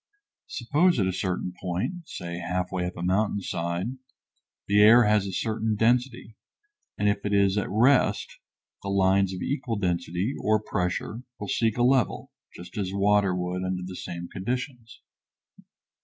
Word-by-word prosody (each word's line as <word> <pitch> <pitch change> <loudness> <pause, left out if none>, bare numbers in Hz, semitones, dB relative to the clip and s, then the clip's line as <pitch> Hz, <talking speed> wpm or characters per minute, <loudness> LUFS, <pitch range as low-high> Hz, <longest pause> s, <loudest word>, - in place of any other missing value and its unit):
Suppose 175 - +2
at 95 - +2
a 95 - 0
certain 90 -1 -2
point, 95 - -3
say 85 -1 -6
halfway 90 0 -2
up 90 - -7
a 85 - -5
mountain 100 +3 +1
side, 90 +7 -3 0.7
the 100 +1 +4
air 115 +3 +8
has 105 -2 +2
a - - -4
certain 110 +2 -1
density, 120 0 0 0.6
and 105 - +1
if 100 0 +1
it 105 - -1
is 100 -1 +3
at 105 - -1
rest 125 +7 +2 0.4
the 100 - -5
lines 95 0 +3
of 90 -1 -5
equal 130 -4 -2
density 90 +3 -1
or 110 0 +3
pressure 100 +3 -3 0.2
will 105 - -5
seek 115 -1 +1
a 120 - +2
level, 125 -3 +1 0.2
just 90 +6 -8
as 95 -2 -2
water 100 -1 +2
would 90 0 -3
under 95 -1 -2
the 95 0 -7
same 85 -1 -6
conditions. 120 +4 -5
100 Hz, 155 wpm, -26 LUFS, 90-115 Hz, 0.7 s, air